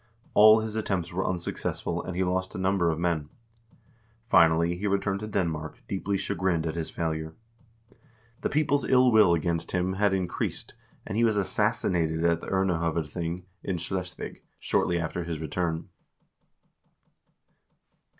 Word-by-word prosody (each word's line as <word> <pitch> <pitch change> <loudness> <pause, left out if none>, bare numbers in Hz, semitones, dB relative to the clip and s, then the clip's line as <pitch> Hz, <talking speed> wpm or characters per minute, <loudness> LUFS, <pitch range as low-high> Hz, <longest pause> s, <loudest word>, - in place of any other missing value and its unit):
All 110 +1 +8
his 110 -1 -4
attempts 95 -6 -2
were 95 +2 0
unsuccessful, 90 -2 -2
and 90 - -6
he 95 - +1
lost 95 +1 -1
a - - -3
number 95 -2 +2
of 80 - -1
men. 85 -3 -1 1.0
Finally 85 -4 +4
he 105 +3 -2
returned 100 0 0
to 105 - -5
Denmark, 80 -7 -2
deeply 100 0 -1
chagrined 90 -3 -1
at 80 - -1
his 85 -2 -3
failure. 80 -1 -3 1.1
The - - 0
people's 145 -1 +1
ill 130 -1 +5
will 105 -6 +6
against 85 0 -2
him 90 +1 0
had 100 +1 +2
in 95 -2 -1
creased, - - -4 0.3
and 105 - -4
he 115 - +3
was 110 -3 +3
assassinated 85 -4 0
at 85 -1 +2
the - - -8
Urnehovedthing, 85 -2 -1 0.2
in 95 -2 -2
Schleswig, 90 +1 -5 0.2
shortly 85 - +1
after 85 +1 -3
his 85 -1 -4
return. 80 +1 -2
90 Hz, 145 wpm, -27 LUFS, 85-100 Hz, 1.1 s, All